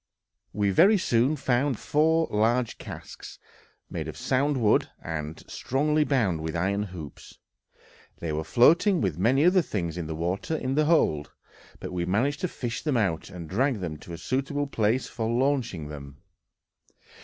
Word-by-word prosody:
We 100 Hz, -1 st, 0 dB
very 195 Hz, -, +6 dB
soon 125 Hz, -3 st, +2 dB
found 130 Hz, -2 st, 0 dB
four 160 Hz, +5 st, +2 dB
large 115 Hz, +3 st, +1 dB
casks, -, -, -9 dB, 0.5 s
made -, -, -5 dB
of -, -, -7 dB
sound 140 Hz, +2 st, +1 dB
wood, 110 Hz, -4 st, +2 dB
and 80 Hz, -1 st, -5 dB
strongly 150 Hz, +4 st, 0 dB
bound 110 Hz, -, +1 dB
with 80 Hz, +1 st, -4 dB
iron 95 Hz, +4 st, 0 dB
hoops; 90 Hz, -8 st, -9 dB, 0.8 s
they 85 Hz, -, -4 dB
were 80 Hz, +1 st, -2 dB
floating 170 Hz, -, +4 dB
with 90 Hz, -6 st, -1 dB
many 130 Hz, -, +3 dB
other 185 Hz, +1 st, +5 dB
things 85 Hz, -, -3 dB
in 80 Hz, -, -4 dB
the 80 Hz, -, -4 dB
water 90 Hz, -, -2 dB
in 130 Hz, -2 st, -2 dB
the 150 Hz, +2 st, +2 dB
hold, 115 Hz, -, +2 dB, 0.5 s
but -, -, -6 dB
we 90 Hz, -1 st, -1 dB
managed 130 Hz, +10 st, 0 dB
to 180 Hz, -, +1 dB
fish 120 Hz, -8 st, -5 dB
them 150 Hz, -5 st, 0 dB
out, 95 Hz, -8 st, -1 dB
and 90 Hz, -4 st, -8 dB
drag 125 Hz, -, 0 dB
them 85 Hz, -4 st, -4 dB
to 85 Hz, -, -10 dB
a -, -, -6 dB
suitable 140 Hz, -, -2 dB
place 115 Hz, -2 st, 0 dB
for 110 Hz, -1 st, -3 dB
launching 120 Hz, -, 0 dB
them. 70 Hz, -2 st, -9 dB
115 Hz, 165 wpm, -26 LUFS, 85-145 Hz, 0.8 s, very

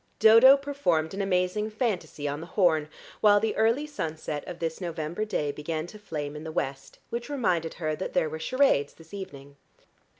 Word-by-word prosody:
Dodo 230 Hz, +5 st, +8 dB
performed 275 Hz, -, 0 dB
an 200 Hz, -, -2 dB
amazing 195 Hz, +2 st, 0 dB
fantasy 195 Hz, -, -2 dB
on 145 Hz, +1 st, -3 dB
the 165 Hz, -, -8 dB
horn, 160 Hz, -5 st, +2 dB, 0.3 s
while 205 Hz, -1 st, +6 dB
the 220 Hz, +1 st, -1 dB
early 230 Hz, +7 st, +2 dB
sunset 160 Hz, -, -4 dB
of 175 Hz, -, -6 dB
this 165 Hz, +1 st, -4 dB
November 170 Hz, +3 st, -3 dB
day 150 Hz, -9 st, -1 dB
began 155 Hz, +2 st, -4 dB
to 210 Hz, +5 st, -11 dB
flame 150 Hz, -7 st, -5 dB
in 150 Hz, -, -7 dB
the 160 Hz, -, -6 dB
west, 135 Hz, -4 st, -4 dB
which 235 Hz, +3 st, -4 dB
reminded 180 Hz, -, 0 dB
her 155 Hz, -3 st, -2 dB
that 185 Hz, -, -5 dB
there -, -, +2 dB
were 160 Hz, +1 st, -6 dB
charades 255 Hz, -, +2 dB
this 165 Hz, +1 st, -17 dB
evening. 140 Hz, -8 st, -9 dB
175 Hz, 185 wpm, -27 LUFS, 155-215 Hz, 0.3 s, Dodo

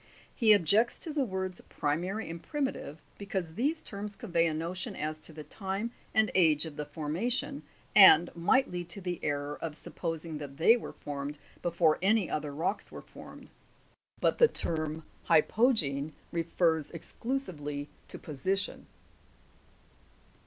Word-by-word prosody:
He 225 Hz, -2 st, +4 dB
objects 205 Hz, +5 st, +3 dB
to 315 Hz, -, -5 dB
the 290 Hz, -2 st, +1 dB
words 190 Hz, -5 st, -3 dB
primary 180 Hz, +9 st, -2 dB
and 165 Hz, 0 st, -6 dB
primitive, 275 Hz, -, -3 dB, 0.2 s
because 190 Hz, -5 st, -3 dB
these 290 Hz, -, 0 dB
terms 205 Hz, 0 st, -6 dB
convey 170 Hz, -7 st, +1 dB
a 160 Hz, -, -1 dB
notion 170 Hz, +3 st, -3 dB
as 155 Hz, +1 st, -3 dB
to 155 Hz, -, -9 dB
the 155 Hz, -1 st, -9 dB
time, 195 Hz, +6 st, -4 dB, 0.2 s
and 220 Hz, -1 st, +3 dB
age 160 Hz, -4 st, +4 dB
of 160 Hz, -2 st, -7 dB
the 150 Hz, -1 st, -5 dB
formation, 160 Hz, -, -2 dB, 0.3 s
and 175 Hz, -5 st, +8 dB
might 260 Hz, +11 st, +3 dB
lead 175 Hz, -1 st, -5 dB
to 200 Hz, -, -4 dB
the 180 Hz, -2 st, -3 dB
error 145 Hz, 0 st, -2 dB
of 160 Hz, -2 st, -3 dB
supposing 165 Hz, -1 st, -4 dB
that 140 Hz, -2 st, -8 dB
they 220 Hz, +9 st, +6 dB
were 240 Hz, -, -6 dB
formed 145 Hz, 0 st, -5 dB, 0.2 s
before 170 Hz, -2 st, +2 dB
any 200 Hz, -1 st, +2 dB
other 150 Hz, -1 st, -2 dB
rocks 175 Hz, +8 st, -2 dB
were -, -, -9 dB
formed, -, -, -12 dB, 0.7 s
but -, -, +2 dB
the 470 Hz, -, +8 dB
term 155 Hz, -, +1 dB, 0.2 s
hypo' 215 Hz, +10 st, +4 dB
gene 145 Hz, -, -1 dB, 0.2 s
refers 165 Hz, -2 st, +1 dB
exclusively 160 Hz, -, -4 dB, 0.2 s
to -, -, -5 dB
position. 190 Hz, +7 st, -2 dB
170 Hz, 145 wpm, -30 LUFS, 155-200 Hz, 0.7 s, and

